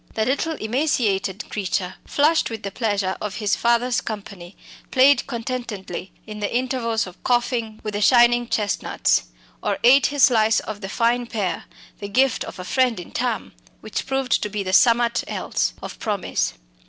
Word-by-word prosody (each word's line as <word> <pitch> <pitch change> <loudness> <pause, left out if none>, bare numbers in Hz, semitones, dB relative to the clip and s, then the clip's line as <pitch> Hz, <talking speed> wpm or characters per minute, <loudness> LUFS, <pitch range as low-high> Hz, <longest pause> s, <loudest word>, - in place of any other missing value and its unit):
The 220 - +1
little 285 +6 0
emaciated 215 - -1
creature, 185 -2 -2
flushed 310 +3 +2
with 225 -2 -6
the 200 - -4
pleasure 200 -4 -1
of 210 -1 -4
his 210 -3 0
father's 240 +1 +1
company, 200 -4 -8 0.3
played 275 +2 +4
contentedly 230 -7 -5
in 215 -1 -8
the 205 - -2
intervals 240 -2 0
of 185 -1 -13
coughing 240 -3 0
with 215 - -4
the 205 - -2
shining 240 +1 +5
chestnuts, 210 -3 0 0.4
or - - -1
ate 270 +3 +6
his 285 -2 0
slice 220 -3 +5
of 210 -1 -7
the 195 - -5
fine 240 +3 +1
pear 205 -6 -3 0.3
the 200 - -5
gift 260 +3 +2
of - - -9
a 180 - -6
friend 250 0 +1
in 175 - -10
Thame - - -2 0.3
which - - -4
proved 265 -2 0
to 210 - -2
be 205 -1 -3
the 185 0 -3
"summat 235 +2 +4
else" - - -1
of - - -8
promise. - - -1
225 Hz, 165 wpm, -22 LUFS, 205-250 Hz, 0.4 s, ate